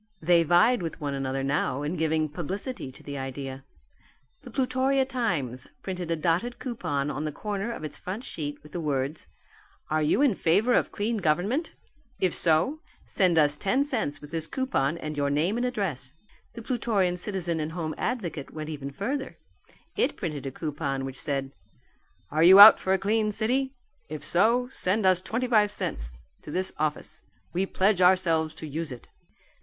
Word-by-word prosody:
They 170 +1 +4
vied 175 +8 +4
with 165 0 -5
one 145 -3 -3
another 135 0 -2
now 140 0 0
in 150 +5 -2
giving 160 -1 +1
publicity 180 - -5
to - - -15
the 140 -1 -6
idea. 135 0 -6 0.8
The 265 - -11
Plutorian 260 +2 +1
Times 170 - -2 0.2
printed 180 -3 -4
a 165 - +1
dotted 175 +10 0
coupon 150 - -2
on 145 +1 -4
the 155 - -2
corner 205 +6 -3
of 230 - -7
its 155 - -5
front 200 +7 -5
sheet 145 - -5
with 150 - -14
the 175 - -4
words, 140 0 -2 0.6
"Are 155 0 +2
you 155 - +3
in 275 -6 +4
favour 200 +8 +2
of - - +2
Clean 220 +2 -1
Government? 200 - 0 0.4
If 185 - +1
so, 170 - +2 0.3
send 180 -4 +2
us 145 -1 +4
ten 255 - +1
cents 230 - -3
with 150 - -11
this 165 -1 -1
coupon 170 - -1
and 155 -2 -5
your 140 -1 0
name 155 +8 +1
and 245 +1 0
address." 160 - -3 0.4
The 230 - -8
Plutorian 215 -7 0
Citizen 180 -3 -1
and 155 +1 -3
Home 160 -3 -3
Advocate, 180 - -3
went 155 0 -6
even 140 -2 -5
further. 265 - -4 0.6
It - - +1
printed 150 -7 -4
a - - -4
coupon 140 -2 -3
which 135 0 -6
said, 135 -2 -2 0.8
"Are 155 - +1
you 185 +4 +9
out 210 +2 +12
for 190 - -2
a - - +3
clean 215 +3 +1
city? 260 +6 0 0.3
If 155 0 -6
so 230 +7 +3
send 205 -3 0
us 185 -1 +4
twenty 230 +6 -2
five 215 -4 +4
cents - - -2 0.2
to - - -11
this 185 +5 -1
office. 155 -1 -2 0.3
We 190 +2 0
pledge 190 0 +2
ourselves 170 -4 +3
to 155 - -6
use 155 +1 -3
it." 125 - -9
170 Hz, 180 wpm, -27 LUFS, 150-215 Hz, 0.8 s, out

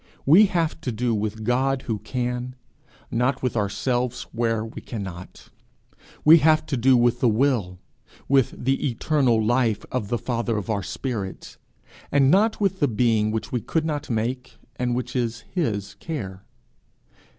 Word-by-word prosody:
We 185 +9 +7
have 165 -3 -1
to 125 - -3
do 120 +1 -1
with 110 +1 -3
God 130 +3 +1
who 110 -3 -3
can, 125 +2 -3 0.6
not 125 +3 0
with 125 - -1
ourselves 120 +4 -1
where 115 -1 0
we 115 - -9
cannot; 95 -6 -8 0.8
we 160 +2 +9
have 155 +1 +3
to 140 - -2
do 130 +1 +4
with 120 0 +2
the 120 - +3
Will, 110 -6 +1 0.5
with 135 -1 +2
the 135 +2 +1
Eternal 120 -3 +1
Life 120 -2 +1
of 125 -5 -2
the 120 - -1
Father 115 -2 -2
of 105 +2 -3
our 100 -2 -1
spirits, 105 -3 -5 0.5
and 140 -1 +4
not 215 +4 +3
with 195 -2 0
the 145 - +3
being 110 -2 +2
which 110 0 -3
we 125 - -1
could 160 +6 -1
not 150 -3 -3
make, 125 +3 -3 0.2
and 125 -1 -1
which 125 +1 -4
is 115 -2 -1
his 110 - -2
care. 100 - -5
125 Hz, 160 wpm, -24 LUFS, 110-135 Hz, 0.8 s, we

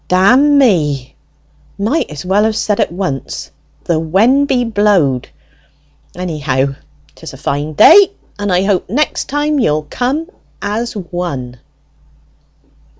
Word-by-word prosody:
"Dammy 190 - +3 0.6
might 225 +11 -1
as 150 +2 -8
well 195 +3 +2
have 220 0 0
said 210 -1 -1
at - - +1
once, 170 -7 -5 0.3
the 165 -2 0
when 220 - +2
be 250 -3 +1
blowed! 205 - +1 0.9
Anyhow, 145 -6 -2 0.4
'tis - - -11
a - - -10
fine 145 +2 -3
day, 385 - +7 0.3
and 205 -1 -2
I 180 +1 +2
hope 195 -3 0
next 290 +9 -1
time 295 +1 0
you'll 155 - 0
come 275 +7 -2 0.3
as 225 +4 -3
one." 170 - -5
195 Hz, 120 wpm, -15 LUFS, 155-245 Hz, 0.9 s, day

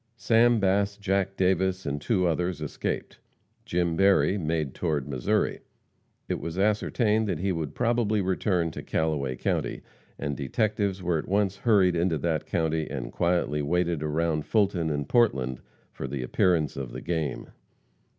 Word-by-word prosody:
Sam 115 0 +4
Bass, 100 +1 +1
Jack 95 -1 -1
Davis 95 0 +1
and 70 0 -2
two 95 0 +1
others 90 +1 0
escaped. 75 -2 -4 0.5
Jim 85 -1 0
Berry 95 +2 +4
made 80 -6 -1
toward 75 -6 -1
Missouri. 65 -4 0 0.7
It - - -2
was 85 +1 -5
ascertained 105 +2 +1
that 90 - -1
he 95 +4 -1
would 80 -5 -3
probably 115 -3 +1
return 90 -3 0
to - - -7
Callaway 75 -5 -1
county, - - -2 0.3
and 70 0 -3
detectives 100 - -1
were 85 -2 +1
at - - -7
once 100 -1 +1
hurried 100 -6 +3
into 85 -1 +1
that 80 +1 -1
county 80 -1 0
and - - -5
quietly 85 -4 0
waited 85 +1 0
around 75 0 -1
Fulton 95 -7 +1
and 70 -2 -2
Portland 65 - +2 0.3
for 65 - -6
the 65 -1 -4
appearance 80 +2 +1
of 65 -3 -5
"the 65 - -6
game." 80 -4 -3
85 Hz, 150 wpm, -27 LUFS, 75-100 Hz, 0.7 s, Sam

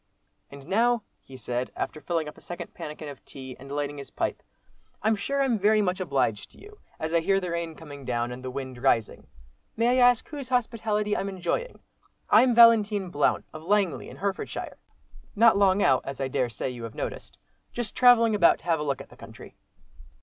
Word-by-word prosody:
"And 140 -1 -12
now," 230 +4 +2 0.2
he 130 - -13
said, 125 0 -3
after 155 - -4
filling 165 -2 -2
up 150 - -8
a - - -17
second 175 - -8
pannikin 150 0 -7
of 140 -2 -10
tea, 130 -2 -10
and 135 +1 -11
lighting 145 0 -3
his 140 - -9
pipe, - - -3 0.6
"I'm 220 +1 +3
sure 275 +7 -1
I'm 240 -5 +1
very 215 +2 +4
much 185 -2 0
obliged 140 - -1
to - - -19
you, 420 0 -15 0.2
as 160 +1 -3
I 170 - +4
hear 195 +4 +2
the 180 -2 -4
rain 170 -1 -3
coming 145 -4 -11
down, 120 -1 -2
and 125 +1 -8
the 130 - -4
wind 130 -1 -6
rising. 115 -5 +1 0.5
May 240 +3 +3
I 245 - +8
ask 245 -2 -1
whose 280 -4 -7
hospitality 220 -4 0
I'm 200 - -2
enjoying? 190 - -3 0.5
I'm 250 -2 +6
Valentine 215 -5 +5
Blount 145 -2 +1
of 155 - -8
Langley 195 +1 0
in - - -11
Herefordshire. 195 +1 -4 0.6
Not 225 +1 +6
long 200 0 +4
out, 130 -2 +4
as 135 -1 -7
I 135 - -1
dare 130 -1 -1
say 115 +3 -4
you 120 -2 -7
have 115 - -9
noticed. - - -6 0.3
Just 240 -3 -4
travelling 235 -3 +6
about 195 -5 +5
to - - -23
have 165 -2 +1
a - - -2
look 140 -3 -2
at - - -13
the - - -16
country." - - -13
175 Hz, 205 wpm, -26 LUFS, 140-220 Hz, 0.6 s, I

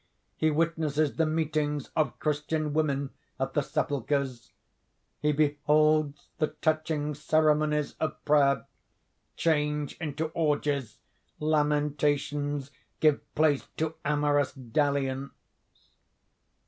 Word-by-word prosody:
He 155 - +2
witnesses 155 -2 0
the 160 -1 +3
meetings 155 -2 -1
of 150 -5 +1
Christian 150 0 -1
women 140 -3 0 0.3
at 135 - -2
the 145 - +2
sepulchres. 135 -3 -2 0.7
He 150 - +2
beholds 150 0 +2
the 155 - +3
touching 155 -1 -1
ceremonies 150 0 +2
of 155 - -1
prayer, 140 -2 +3 0.7
change 150 -2 0
into 155 -1 -3
orgies, 145 -6 -1 0.4
lamentations 145 -1 0 0.3
give 155 -2 +4
place 150 -3 +2
to 160 0 -1
amorous 145 -1 +1
dalliance. 135 +1 -1
150 Hz, 95 wpm, -28 LUFS, 145-155 Hz, 0.7 s, give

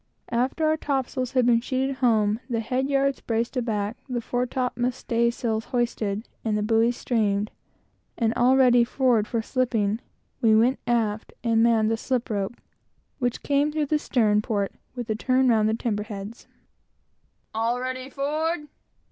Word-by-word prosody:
After 255 +6 0
the 310 0 +2
topsails 265 -3 -2
had 255 -2 +3
been 235 -1 +4
sheeted 265 +1 -1
home, 220 -4 +2
the 235 -2 0
head 255 +4 -1
yards 275 -1 +1
braced 230 +3 -1
aback, 220 -3 -1
the 245 -1 -1
fore 245 +2 -1
top 250 0 -2
mast 245 +1 -1
staysail 235 -1 0
hoisted, 225 -3 -2 0.2
and 215 -2 0
the 210 - -1
buoys 230 +2 +2
streamed, 210 -3 0 0.7
and 225 -1 +1
all 250 +2 +4
ready 245 -2 +6
forward, 235 -3 +2
for 230 -2 -1
slipping, 225 -5 0 0.4
we 220 -2 +5
went 240 +5 +3
aft 225 -3 0
and 230 -2 +3
manned 225 -2 +3
the 225 - +1
slip 250 0 -2
rope 200 +2 -2 0.6
which 245 -2 -1
came 285 +1 +2
through 305 0 0
the 300 +1 +1
stern 215 -7 +2
port 205 -2 -1 0.2
with 245 -2 -5
a 220 - -1
turn 255 +3 +2
round 220 -2 +3
the 220 - +1
timber 220 -3 -2
heads. 210 +1 -8 1.1
"All 230 +2 0
ready 255 +1 -4
forward?" 300 +3 -2
235 Hz, 165 wpm, -25 LUFS, 220-255 Hz, 1.1 s, ready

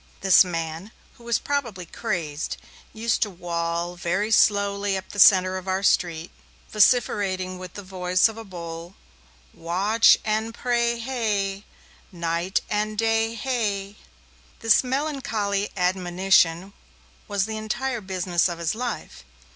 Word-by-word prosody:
This 190 -1 +7
man, 165 +1 -5 0.3
who - - -16
was 235 -1 +1
probably 235 -11 -3
crazed, 165 -6 -4 0.3
used 225 +1 -1
to 210 - +2
wall 170 -1 -3
very 190 +5 -1
slowly 200 -2 +2
up 190 - -8
the 205 - -7
centre 185 -1 +6
of 185 - -14
our 190 +1 -1
street, 170 -3 +1 0.4
vociferating 195 -4 +2
with 185 -1 -9
the 205 - -7
voice 185 +1 +2
of 225 - -7
a 225 - -8
bull, 170 -2 -8 0.6
Wa 180 +5 -2
a - - 0
atch 225 - +8
and 220 +1 -1
pray 235 -1 0
hay! 215 -5 -2 0.5
Night 170 +2 -1
and 210 +1 -2
day 225 +1 +1
hay! 210 -5 -2 0.7
This 225 +2 +4
melancholy 250 -7 -2
admonition 180 0 +2 0.5
was 200 -2 0
the 220 0 -5
entire 240 +3 -3
business 185 -2 0
of 170 - -5
his 170 -1 -1
life. 240 - -5
195 Hz, 135 wpm, -24 LUFS, 180-220 Hz, 0.7 s, atch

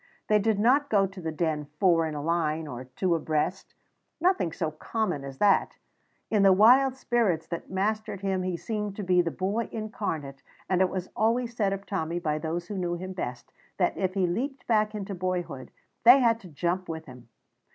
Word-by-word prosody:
They 210 0 +5
did 215 0 +1
not 265 +7 +3
go 200 -2 +4
to 195 0 -8
the 160 -1 -3
Den 155 -2 -1
four 170 -4 +4
in 155 - -5
a 145 - -4
line 160 -1 0
or 125 -3 -7
two 170 +8 -1
abreast 160 +3 -2 0.4
nothing 355 - +2
so 160 0 -2
common 180 -1 -2
as 135 -1 -8
that. 200 +2 +3 0.6
In 210 -2 +3
the 195 -1 +7
wild 250 +7 +6
spirits 230 -11 0
that 170 - -5
mastered 205 +1 -2
him 190 -1 0
he 185 -1 -2
seemed 210 0 -4
to 205 - -5
be 180 -1 +4
the 170 - -1
boy 200 +7 -2
incarnate, 165 -11 -4 0.3
and 185 -1 +2
it 185 - +4
was 185 -1 -4
always 235 +2 +1
said 205 -4 +1
of 195 0 -4
Tommy 170 -4 -2
by 155 -3 -1
those 165 +2 -3
who 200 -1 -4
knew 175 -1 -1
him 185 +2 -6
best 125 -9 -6 0.2
that - - +1
if 185 0 -1
he 190 -2 +2
leaped 255 +10 -3
back 215 -2 +2
into 200 -1 -4
boyhood 175 -7 -3 0.3
they 245 +4 +9
had 230 -3 +3
to 195 - -12
jump 175 +3 -2
with 160 0 -5
him. 125 -3 -13
185 Hz, 200 wpm, -27 LUFS, 165-215 Hz, 0.6 s, they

